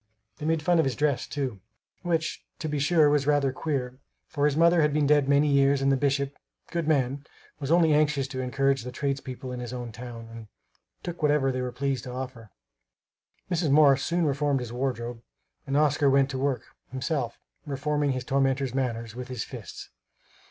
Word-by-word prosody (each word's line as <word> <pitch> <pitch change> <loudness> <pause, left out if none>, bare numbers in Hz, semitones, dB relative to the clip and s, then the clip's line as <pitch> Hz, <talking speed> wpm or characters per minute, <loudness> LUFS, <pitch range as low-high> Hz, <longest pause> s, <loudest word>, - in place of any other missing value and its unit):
They 150 - -3
made 160 -1 +1
fun 175 +1 +3
of 160 - +3
his 135 - -1
dress, 145 -3 0
too, 130 -8 -3 0.4
which 165 -2 -1
to 155 - -4
be 150 -1 -2
sure 155 +1 +4
was 145 -1 +2
rather 145 -2 +3
queer, 130 -3 -3 0.3
for 145 -1 -1
his 150 0 +2
mother 170 +1 +5
had 150 -1 +2
been 150 -1 +3
dead 145 -1 +3
many 145 +1 +4
years 140 -1 +4
and 135 0 +2
the - - +4
bishop, 140 0 0 0.4
good 170 -3 -2
man, 140 -2 +1 0.4
was 140 -2 -4
only 165 -2 +5
anxious 150 -2 +2
to 130 -1 -5
encourage 135 +1 +1
the 125 - -6
tradespeople 130 -1 -4
in 125 - -5
his 120 0 -6
own 120 -2 -5
town, 115 0 -9
and 115 -1 -10 0.6
took 175 -1 -6
whatever 145 -3 +3
they 130 0 -2
were 125 0 -3
pleased 135 +1 -2
to 125 - -6
offer. 125 -3 -7 1.0
Mrs. 170 -3 +1
Morris 140 -1 +6
soon 170 0 +1
reformed 140 -1 +1
his 120 -1 -6
wardrobe, 120 -2 -3 0.5
and 135 +1 +1
Oscar 145 -1 +3
went 135 0 +3
to 130 - -3
work, 130 -3 0 0.3
himself, 130 -2 -2 0.3
reforming 145 +1 0
his 130 -1 -3
tormentors' 135 -1 +1
manners 115 -4 -2
with 125 +1 -7
his 125 -5 -4
fists. - - -9
140 Hz, 190 wpm, -27 LUFS, 125-150 Hz, 1.0 s, Morris